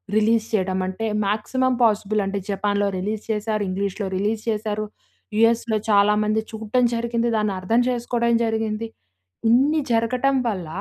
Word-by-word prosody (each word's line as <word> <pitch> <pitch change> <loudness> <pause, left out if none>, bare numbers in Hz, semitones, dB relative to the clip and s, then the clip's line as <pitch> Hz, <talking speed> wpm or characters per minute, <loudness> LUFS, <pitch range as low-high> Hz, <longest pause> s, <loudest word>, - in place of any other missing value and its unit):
Release 220 +1 +3
చేయడం 190 -2 0
అంటే 190 +4 -4 0.2
maximum 250 +5 0
possible 215 -1 +2
అంటే 195 +1 -2
జపాన్‌లో 205 +1 0
రిలీజ్ 210 +3 -3
చేశారు. 215 0 -1
ఇంగ్లీష్‌లో 195 +1 -2
రిలీజ్ 210 +3 -1
చేశారు. 215 -1 -2 0.5
యూఎస్‌లో 230 0 +3
చాలామంది 210 +1 +3
చూడటం 220 +3 0
జరిగింది. 235 0 -1
దాన్ని 210 -2 0
అర్థం 225 +6 +2
చేసుకోవడం 235 -1 0
జరిగింది. 220 0 -2 0.6
ఇన్ని 285 +6 +4
జరగటం 250 +4 +1
వల్ల 185 -6 -4
215 Hz, 130 wpm, -22 LUFS, 205-230 Hz, 0.6 s, ఇన్ని